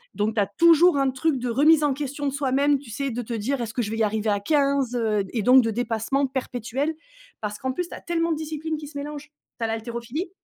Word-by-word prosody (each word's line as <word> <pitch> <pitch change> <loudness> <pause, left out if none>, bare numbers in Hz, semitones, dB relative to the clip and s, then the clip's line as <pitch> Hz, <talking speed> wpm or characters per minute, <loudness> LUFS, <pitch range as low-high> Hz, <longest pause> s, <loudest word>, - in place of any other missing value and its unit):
Donc 215 +2 0
tu 215 - +3
as - - +2
toujours 335 -1 +5
un 275 -1 +2
truc 265 +2 0
de 245 0 -3
remise 300 +6 +5
en 290 -2 +2
question 285 0 -3
de - - 0
soi 280 -2 -1
même, 285 +2 +3
tu 265 -5 -12
sais 275 +5 -2
de 240 +1 -3
te 235 - -6
dire: 240 +5 -1
«Est-ce 225 -1 -4
que 245 - -1
je 210 - -3
vais 225 - -3
y 225 - +2
arriver 215 +1 0
à 205 -1 +1
15,? 275 +1 +1
Heu, 215 -4 +1
et 230 - -1
donc 250 +4 +6
de 225 - 0
dépassement 245 +4 0
perpétuel, 260 +2 -3 0.5
parce 210 -1 -4
qu'en 260 +3 -2
plus, 345 +7 -3
tu - - -7
as - - -10
tellement 335 -1 0
de 315 - 0
disciplines 315 0 -4
qui 300 -1 -8
se 290 - -14
mélangent. 295 +1 -6 0.3
Tu - - -3
as - - 0
l'haltérophilie 235 - -4
265 Hz, 265 wpm, -24 LUFS, 225-295 Hz, 0.5 s, donc